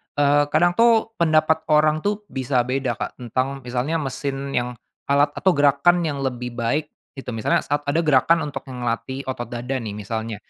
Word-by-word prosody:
eee, 145 0 +4
kadang 165 +4 +3
tuh 230 -1 +4
pendapat 160 -1 +2
orang 155 0 +3
tuh 205 +4 -2
bisa 130 -1 0
beda, 130 -1 -1
Kak, - - -6
tentang 130 +3 -2
misalnya 130 +6 -2
mesin 140 -1 -4
yang 120 0 0 0.4
alat 145 +1 +3
atau 190 - +3
gerakan 145 +3 +3
yang 145 -2 -3
lebih 125 -2 -4
baik 120 +6 -1 0.3
itu 135 -2 -7
misalnya 110 -2 0
saat 145 +1 -1
ada 145 +3 +2
gerakan 155 +2 +3
untuk 140 -1 -8
yang 125 -2 -7
ngelatih 130 +3 -3
otot 130 -3 -5
dada 125 +2 -4
nih 110 -4 -6
misalnya, 110 +2 -4
135 Hz, 175 wpm, -22 LUFS, 125-155 Hz, 0.4 s, eee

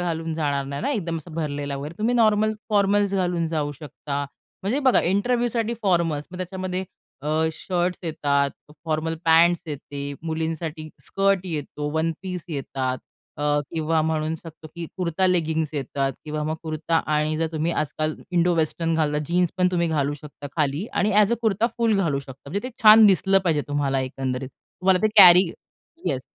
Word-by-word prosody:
घालून 165 -2 -2
जाणार 145 -3 -1
नाही 140 +1 -5
ना? - - 0
एकदम 170 - -2
असा 160 - -12
भरलेला 145 -3 -3
वगैरे 145 +4 -6
तुम्ही 225 +3 +1
नॉर्मल 215 -2 +3 0.2
फॉर्मल्स 205 -1 +2
घालून 175 -3 0
जाऊ 150 -2 -2
शकता. 145 -1 -5 0.4
म्हणजे 210 +8 0
बघा 260 -3 +4
इंटरव्ह्यूसाठी 235 +3 0
फॉर्मल्स 170 -6 +1
मग 180 - -8
त्याच्यामध्ये 185 0 -3 0.4
अ, 145 - -8 0.3
शर्ट्स 180 +2 -2
येतात, 145 -4 0 0.3
फॉर्मल 160 0 -1
पँट्स 170 +1 +5
येते, 145 -1 -6
मुलींसाठी 160 -1 -3 0.2
स्कर्ट 195 -1 +2
येतो, 150 -3 -4
वनपीस 165 +2 -2
येतात. 135 -4 -3 0.4
अ, 145 - -5 0.3
किंवा 160 0 0
म्हणू 160 0 -1
शकतो, 160 -1 -11
की 170 -1 -5
कुर्ता, 180 0 0
लेगिंग्ज 160 -4 +1
येतात 135 -1 -2
किंवा 155 0 -3
मग 155 - -1
कुर्ता 160 +1 -1 0.2
आणि 150 +1 +1
जर 165 - +1
तुम्ही 160 +2 -1
आजकाल 155 0 -1 0.2
इंडोवेस्टर्न 165 -1 +1
घालता 150 -2 +1
जीन्सपण 180 +1 +1
तुम्ही 170 -2 +1
घालू 145 -2 0
शकता 145 0 -10
खाली 150 +5 0
आणि 210 - +1
ॲज 210 +1 +5
अ - - +4
कुर्ता 220 0 +2
फुल 230 -2 +2
घालू 165 -8 +1
शकता. 135 +1 -12
म्हणजे 200 +6 -1
ते - - -11
छान 215 0 +9
दिसलं 195 0 +4
पाहिजे 155 -4 +2
तुम्हाला 140 -2 0
एकंदरीत. 130 0 -3
तुम्हाला 185 +7 -1
ते 215 - +4
कॅरी 180 +1 +10 0.6
येस 130 -2 0
165 Hz, 160 wpm, -24 LUFS, 150-185 Hz, 0.6 s, कॅरी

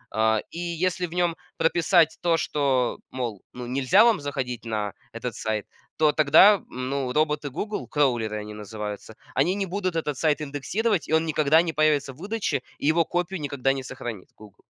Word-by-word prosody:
Э, 110 0 +3
и 170 - -7
если 175 +1 -1
в 165 - -11
нем 175 -2 +1 0.2
прописать 165 0 +3
то, 170 -2 +2
что, 135 -6 0
мол, 120 -6 -4
ну 125 0 -7
нельзя 130 - +4
вам 225 -7 +3
заходить 130 -4 -4
на 105 -3 -2 0.2
этот 115 +1 -5
сайт, 110 -2 -2 0.3
то 155 -1 +4
тогда 165 +7 +6
ну 130 +1 -3
роботы 150 0 0
"Гугл", 210 +10 -4
кроулеры 120 -7 +1
они 105 0 -7
называются, 105 0 -7 0.2
они 155 +7 +3
не 200 -1 -1
будут 185 -1 -2
этот 150 -4 -2
сайт 155 0 +1
индексировать, 170 +8 -1
и - - -1
он 160 +1 +3
никогда 155 0 +4
не 170 -2 -3
появится 150 -3 +2
выдаче, 195 - -2 0.2
и - - -6
его 165 +2 +4
копию 175 +1 -2
никогда 135 -2 0
не 135 -1 -5
сохранит 120 -7 -7
"Гугл". 105 -2 -16
145 Hz, 175 wpm, -25 LUFS, 125-170 Hz, 0.3 s, тогда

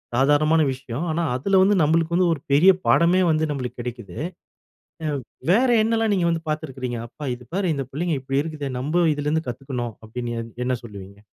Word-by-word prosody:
சாதாரணமான 145 +4 +4
விஷயம். 130 +4 -5
ஆனா, 170 +2 0
அதில 190 +9 +2
வந்து 205 +2 +4
நம்பளுக்கு 165 +2 +2
வந்து 180 -1 +3
ஒரு 145 - -6
பெரிய 170 +7 +7
பாடமே 175 +2 +4
வந்து 155 0 +1
நம்பளுக்கு 125 -3 -5
கிடைக்குது. 120 -3 -7 0.9
அ - - 0 0.4
வேற 245 +7 +4
என்னெல்லாம் 225 -1 +1
நீங்க 175 -3 +1
வந்து 165 -1 -2
பாத்திருக்கிறீங்க? 130 -5 -3
அப்பா 145 +3 -8
இது 125 - -13
பாரு 190 -4 +1
இந்த 135 -1 -3
பிள்ளைங்க 165 +2 -1
இப்படி 135 +1 0
இருக்குதே, 150 -4 -5
நம்ம 160 +7 +1
இதிலிருந்து 150 +2 -1
கத்துக்கணும் 125 -2 -4
அப்பிடின்னு 120 +1 -5
எ - - -5 0.2
என்ன 125 0 0
சொல்லுவீங்க? 100 -2 -10
145 Hz, 175 wpm, -23 LUFS, 125-170 Hz, 0.9 s, பெரிய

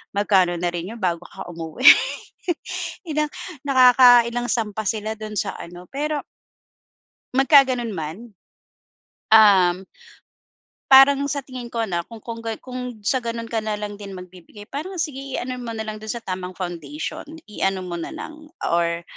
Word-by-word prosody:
Magkano 190 -4 +3
na 175 - 0
rin 175 +3 -5
yun - - -11
bago 175 -2 -1
ka - - -10
umuwi, 165 - -6 1.2
ilang 305 -1 0 0.4
nakaka-ilang 245 -2 +6
sampa 220 -2 -1
sila 215 0 -1
dun 215 0 -7
sa - - -3
ano, 175 +1 -10
pero 295 +1 -3 1.1
Magkaganon 265 -4 +4
man, 160 -1 -5 1.2
um. 190 -4 +6 1.1
Parang 270 +1 +8
sa 285 0 -2
tingin 255 -2 -8
ko, 230 -1 -1
'no, 175 -6 -2
kung 230 -2 -12
kung 230 -1 -6
gan 225 -1 -4
kung 250 -3 -7
sa 230 +6 +1
ganun 230 -1 -5
ka 230 - -1
na 215 -1 -2
lang 205 -1 -6
din 200 -2 -8
magbibigay 185 +2 -12
parang 315 +8 -5
sige 305 -6 -3 0.2
i-ano 250 0 -3
mo 235 -2 -6
na 220 - -3
lang 215 -1 -6
dun 215 0 -5
sa 235 - -6
tamang 185 -2 -5
foundation. 165 -5 -5 0.3
I-ano 195 -2 -1
mo 175 -1 -5
na 170 - -6
lang 310 0 -9 0.2
or, 170 0 0
220 Hz, 155 wpm, -22 LUFS, 185-250 Hz, 1.2 s, Parang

